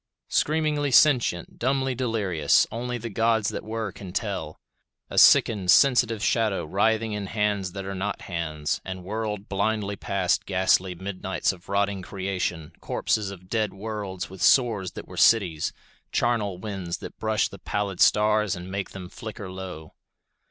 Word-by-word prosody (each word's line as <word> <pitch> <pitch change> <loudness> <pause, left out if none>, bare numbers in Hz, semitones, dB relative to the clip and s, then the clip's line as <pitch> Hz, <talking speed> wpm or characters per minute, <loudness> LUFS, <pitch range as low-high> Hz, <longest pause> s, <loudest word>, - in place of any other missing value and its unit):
Screamingly 150 -2 +1
sentient, 125 - +3
dumbly 135 +1 +1
delirious, 105 - +2
only 120 +1 -3
the 115 0 -6
gods 110 0 +2
that - - -5
were 110 -1 -4
can 95 -2 -9
tell. 95 -8 -3 0.5
A - - +3
sickened, 100 -5 +5
sensitive 120 0 +4
shadow 110 -7 +1
writhing 110 +5 +1
in 105 -1 -4
hands 105 -3 -1
that 95 -1 -5
are 100 - -4
not 100 +2 -3
hands, 80 -4 -3
and 95 -1 -6
whirled 105 +1 -4
blindly 100 0 -1
past 95 -2 0
ghastly 95 -1 +2
midnights 95 0 -2
of 90 -1 -16
rotting 100 -1 0
creation, 90 -4 -3
corpses 105 -3 -1
of 90 -2 -11
dead 110 0 -1
worlds 100 -3 -5
with 95 0 -11
sores 110 -8 +3
that - - -8
were - - -11
cities, 90 -9 +3 0.4
charnel 110 -6 0
winds 95 -3 -4
that - - -10
brush 110 -1 +1
the 100 - -12
pallid 100 -3 -3
stars 105 -1 +4
and 90 +1 -8
make 100 0 -3
them 95 -2 -8
flicker 100 -1 -8
low. 90 -5 -8
100 Hz, 150 wpm, -25 LUFS, 95-110 Hz, 0.5 s, sickened